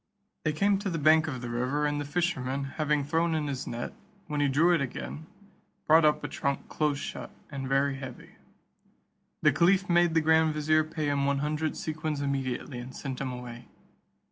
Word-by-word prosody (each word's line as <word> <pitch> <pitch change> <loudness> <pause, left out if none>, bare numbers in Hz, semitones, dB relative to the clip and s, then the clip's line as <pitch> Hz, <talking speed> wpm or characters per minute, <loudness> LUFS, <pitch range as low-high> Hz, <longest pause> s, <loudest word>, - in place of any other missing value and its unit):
They 155 - +3
came 200 +5 +2
to 205 -1 -2
the 165 - -2
bank 155 +1 +5
of 130 -5 -4
the 120 - -5
river, 130 +5 0
and 145 0 0
the - - -4
fisherman, 140 -4 -1
having 150 +1 0
thrown 165 +3 +1
in 155 -1 -1
his 140 -2 -4
net, 120 +1 -4 0.3
when 150 -1 -2
he 145 - +3
drew 155 +6 +4
it 165 - +2
again, 150 +4 -5 0.6
brought 160 +1 +6
up 150 0 +3
a - - -2
trunk 140 -2 -2
close 150 -2 0
shut, - - -6 0.2
and 135 -2 -4
very 135 0 +2
heavy. 130 -2 -9 1.1
The - - +5
caliph 185 +3 +3
made 175 -1 +3
the 160 - +5
grand 160 0 +3
vizier 155 +1 +3
pay 155 0 -4
him 140 -1 +1
one 140 0 +2
hundred 150 +2 -1
sequins 155 -1 -3
immediately, 135 -2 -2
and 125 +2 -8
sent 130 -2 -5
him 130 -2 -2
away. 120 -1 -8
150 Hz, 195 wpm, -28 LUFS, 135-160 Hz, 1.1 s, brought